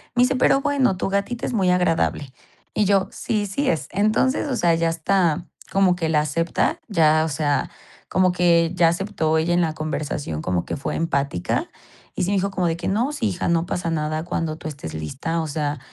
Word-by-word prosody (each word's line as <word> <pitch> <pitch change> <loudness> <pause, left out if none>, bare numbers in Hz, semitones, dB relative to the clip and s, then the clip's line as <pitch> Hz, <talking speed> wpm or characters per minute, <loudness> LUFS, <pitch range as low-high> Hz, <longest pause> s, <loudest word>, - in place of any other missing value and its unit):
Me 245 - +5
dice: 255 +2 +2
"Pero, 265 +2 +4
bueno, 270 -9 +1
tu - - -1
gatita 200 +5 -1
es - - -3
muy 190 -5 +2
agradable". 165 -5 +1 0.5
Y - - +4
yo: 195 -1 +3
"Sí, 210 -2 -2
sí 270 +9 -1
es". 160 - -1
Entonces, 215 +8 +1
o 260 - 0
sea, 170 -4 +3
ya 165 0 +1
está, 170 0 +1 0.2
como 195 -2 +3
que 165 -3 -2
la 155 -1 +3
acepta, 165 - 0
ya, 155 -5 +4
o - - -2
sea, 145 0 0 0.4
como 185 0 +3
que 170 -2 +3
ya 170 -2 +5
aceptó 165 -3 0
ella 165 +2 +1
en 175 - +3
la 160 -2 0
conversación, 150 - -3
como 90 0 -1
que - - -3
fue 140 - -3
empática. 140 - -1 0.5
Y - - -1
sí 185 - 0
me - - +2
dijo 195 +1 0
como 185 -2 0
de 165 - 0
que: 170 - -4
"No, 230 +8 +1
sí, 260 -7 -1
hija, 180 -2 -3
no 170 0 +2
pasa 175 -1 -2
nada 155 0 -2
cuando 160 -2 -2
tú 160 - -7
estés 135 - -8
lista, 130 - -3
o 160 - -3
sea, 145 -1 -2
170 Hz, 215 wpm, -22 LUFS, 155-195 Hz, 0.5 s, Me